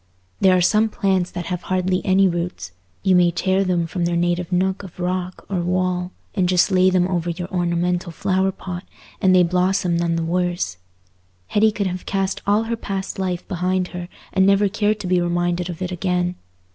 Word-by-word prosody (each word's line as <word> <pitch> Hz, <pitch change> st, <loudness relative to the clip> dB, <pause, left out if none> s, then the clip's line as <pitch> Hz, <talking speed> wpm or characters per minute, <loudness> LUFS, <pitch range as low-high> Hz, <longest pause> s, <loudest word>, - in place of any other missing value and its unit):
There 185 Hz, -1 st, +5 dB
are -, -, +2 dB
some 215 Hz, +5 st, +3 dB
plants 190 Hz, -4 st, 0 dB
that 175 Hz, -1 st, -5 dB
have 180 Hz, +1 st, -3 dB
hardly 185 Hz, 0 st, 0 dB
any 190 Hz, +1 st, +4 dB
roots: 170 Hz, -, -3 dB, 0.3 s
you 190 Hz, -2 st, +4 dB
may 175 Hz, -1 st, +5 dB
tear 190 Hz, +3 st, +1 dB
them 180 Hz, -3 st, +1 dB
from 170 Hz, +1 st, -2 dB
their 170 Hz, 0 st, 0 dB
native 175 Hz, +1 st, 0 dB
nook 190 Hz, +1 st, +1 dB
of 185 Hz, -3 st, -12 dB
rock 180 Hz, 0 st, -3 dB
or 190 Hz, -3 st, -1 dB
wall, 180 Hz, 0 st, -1 dB, 0.2 s
and 185 Hz, -3 st, +1 dB
just 180 Hz, +2 st, +3 dB
lay 185 Hz, 0 st, +5 dB
them 180 Hz, -1 st, +2 dB
over 175 Hz, -2 st, -1 dB
your 175 Hz, +1 st, -4 dB
ornamental 175 Hz, 0 st, 0 dB
flower 190 Hz, +2 st, 0 dB
pot, 180 Hz, -1 st, -7 dB, 0.4 s
and 185 Hz, -1 st, +5 dB
they 180 Hz, -, +6 dB
blossom 180 Hz, 0 st, +1 dB
none 170 Hz, 0 st, 0 dB
the 165 Hz, -, -1 dB
worse. 175 Hz, -, -1 dB, 0.7 s
Hetty 215 Hz, +1 st, +3 dB
could 205 Hz, -1 st, -2 dB
have 185 Hz, -1 st, -4 dB
cast 195 Hz, -1 st, -1 dB
all 205 Hz, +2 st, +3 dB
her 230 Hz, +1 st, -2 dB
past 195 Hz, -4 st, -4 dB
life 180 Hz, -2 st, -2 dB
behind 185 Hz, 0 st, -1 dB
her 175 Hz, -1 st, -7 dB, 0.2 s
and 190 Hz, -, +4 dB
never 200 Hz, +1 st, +4 dB
cared 210 Hz, +1 st, 0 dB
to -, -, -6 dB
be 180 Hz, -1 st, +2 dB
reminded 175 Hz, 0 st, 0 dB
of 175 Hz, +1 st, -5 dB
it 185 Hz, -, -3 dB
again. 180 Hz, 0 st, 0 dB
180 Hz, 195 wpm, -21 LUFS, 175-190 Hz, 0.7 s, they